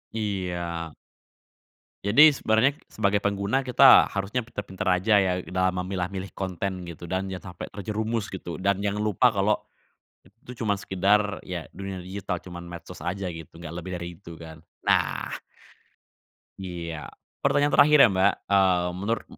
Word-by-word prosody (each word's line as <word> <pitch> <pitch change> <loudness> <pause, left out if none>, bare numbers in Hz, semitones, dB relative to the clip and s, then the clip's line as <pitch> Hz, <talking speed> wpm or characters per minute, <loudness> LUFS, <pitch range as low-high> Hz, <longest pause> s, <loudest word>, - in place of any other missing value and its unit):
Iya. 90 -6 -3 1.1
Jadi, 140 +10 +8
sebenarnya 130 0 +2
sebagai 105 -1 0
pengguna 100 +6 0
kita 130 +1 +7
harusnya 105 +5 -2
pinter-pinter 100 -4 -6 0.2
aja 110 +3 +2
ya 95 -2 +3 0.2
dalam 95 0 0
memilah 90 -1 -2
milih 95 0 -5
konten 95 -1 -3
gitu 85 0 -9
dan 95 +1 -1
jangan 95 -1 -7
sampai - - -7
terjerumus 110 +2 -3
gitu, 95 -1 -7
dan 100 0 +2
jangan 100 +1 -1
lupa 110 +3 +3
kalau 100 +1 +2 0.6
itu 115 +6 -14
cuman 105 -3 +1
sekedar 100 +1 +1
ya 90 -3 -6
dunia 95 0 -6
digital, 95 0 -4
cuman 85 -1 -9
medsos 85 -1 -10
aja 90 +4 -3
gitu 80 -1 -11
nggak 85 -1 -8
lebih 90 +2 -6
dari 85 0 -5
itu 85 -1 -10
kan. 80 -1 -11 0.2
Nah - - +1 1.3
Iya, 85 -4 -6 0.4
pertanyaan 145 +1 +3
terakhir 150 +1 +7
ya, - - +8
Mbak. 95 -1 +3 0.2
Mmm, 95 -3 +3
menurut 110 +5 -2
m - - -14
95 Hz, 150 wpm, -26 LUFS, 90-105 Hz, 1.3 s, Jadi